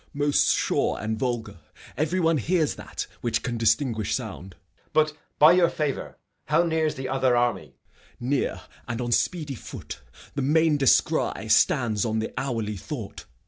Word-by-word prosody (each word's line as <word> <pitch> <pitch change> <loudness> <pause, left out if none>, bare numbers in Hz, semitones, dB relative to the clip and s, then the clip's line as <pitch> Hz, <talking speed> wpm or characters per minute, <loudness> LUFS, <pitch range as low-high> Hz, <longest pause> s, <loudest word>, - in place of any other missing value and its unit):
Gent. - - -30
Most 145 0 +3
sure - - 0
and 110 +1 -2
vulgar. 115 -7 -3 0.4
Every 160 +5 0
one 165 -2 +3
hears 160 +3 +1
that - - -6 0.2
Which 120 - -1
can 120 - -2
distinguish 115 -2 +1
sound. 95 -6 -7
Edg. - - -38
But, 155 -1 +3 0.2
by 150 +2 +8
your 175 -1 +4
favour, 150 -3 -3 0.3
How 155 +4 +3
near's 160 -2 0
the 130 0 -5
other 130 -2 +2
army? 120 0 -1 0.4
Gent. - - -24
Near 140 - 0 0.3
and 120 -1 -3
on 120 -1 -2
speedy 155 +2 0
foot. 120 - -9 0.3
The 140 - -2
main 155 +2 +3
descry 135 -3 +2
Stands 110 -5 +3
on 110 -2 -1
the 110 - -3
hourly 115 -6 -2
thought. - - -7
135 Hz, 165 wpm, -25 LUFS, 115-155 Hz, 0.4 s, by